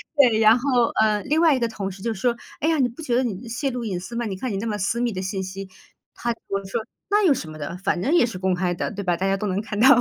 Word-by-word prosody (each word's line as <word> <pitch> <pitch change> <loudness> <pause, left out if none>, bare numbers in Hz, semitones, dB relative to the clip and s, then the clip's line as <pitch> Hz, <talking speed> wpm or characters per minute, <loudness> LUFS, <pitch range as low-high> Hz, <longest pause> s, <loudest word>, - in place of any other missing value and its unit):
对， 245 -7 +5
然 225 +2 +6
后， 275 +3 -2 0.3
呃， 215 -1 +2
另 305 +3 +1
外 320 -4 +5
一 255 - -1
个 235 - +1
同 200 -3 -4
事 190 +1 -11
就 230 - 0
说： 235 +4 0 0.3
“哎 315 - +2
呀， 320 - +2
你 255 - +4
不 245 +7 -11
觉 250 -6 0
得 255 - +3
你 230 0 -4
泄 255 +3 -1
露 245 -1 -4
隐 185 -4 -2
私 235 +6 -8
吗？ 235 0 -1
你 195 -3 -3
看 255 +3 -3
你 195 - -2
那 225 - -3
么 210 -2 -1
私 210 +4 0
密 240 -1 +1
的 185 -1 -4
信 190 0 -3
息。” 190 +1 -7 0.5
他 240 - -3
和 - - -3
我 195 0 -2
说： 195 +5 -2 0.3
“那 415 0 +3
有 310 - +6
什 160 -10 -5
么 155 - -9
的， 155 +4 -5
反 180 -1 0
正 275 - +1
也 345 - +5
是 230 -6 -5
公 190 0 +1
开 180 0 0
的， - - -3
对 200 -1 -5
吧， 175 -2 +1
大 190 +3 0
家 195 - +2
都 210 - -2
能 190 +1 0
看 215 -2 -5
到。” 255 - +7
220 Hz, 350 characters per minute, -23 LUFS, 190-245 Hz, 0.5 s, 到